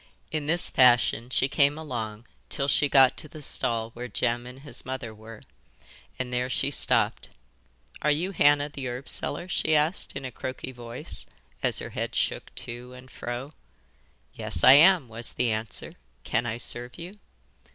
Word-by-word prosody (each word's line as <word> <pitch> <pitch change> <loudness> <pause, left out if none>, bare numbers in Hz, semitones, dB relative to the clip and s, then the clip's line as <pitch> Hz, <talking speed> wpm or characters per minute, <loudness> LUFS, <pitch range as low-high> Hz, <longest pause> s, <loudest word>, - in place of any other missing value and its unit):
In 150 -2 -3
this 170 +2 +4
fashion 120 -2 +4
she 130 +1 +1
came 140 +2 +3
along 115 -7 -5 0.2
till 140 - -1
she 145 0 +2
got 135 -2 +6
to 155 - -5
the 150 0 -11
stall 115 -3 0
where 120 +2 -7
Jem 120 +2 -1
and 125 +2 -11
his 145 - -2
mother 130 -4 -5
were, 110 0 -12 0.7
and 125 -1 -4
there 125 +1 0
she - - 0
stopped. - - +3 0.7
'Are 150 - +2
you 165 +6 0
Hannah 145 -4 +3
the 140 -3 -6
herb 125 +2 -6
seller?' 160 +5 -2
she 160 -3 +1
asked 155 +5 +1
in 135 0 -5
a 130 - -5
croaky 130 +2 -6
voice 120 -2 -8 0.3
as - - +1
her - - -5
head - - -4
shook - - -2
to 120 +1 -8
and 125 0 -13
fro. 120 +4 -6 0.8
'Yes, 85 - -2
I 130 - +10
am,' 165 0 +6
was 115 +1 -4
the 125 -2 0
answer. 110 -1 -4 0.3
'Can 120 +2 -1
I 110 0 -3
serve 120 +1 0
you? 180 +5 -10
130 Hz, 170 wpm, -26 LUFS, 120-145 Hz, 0.8 s, I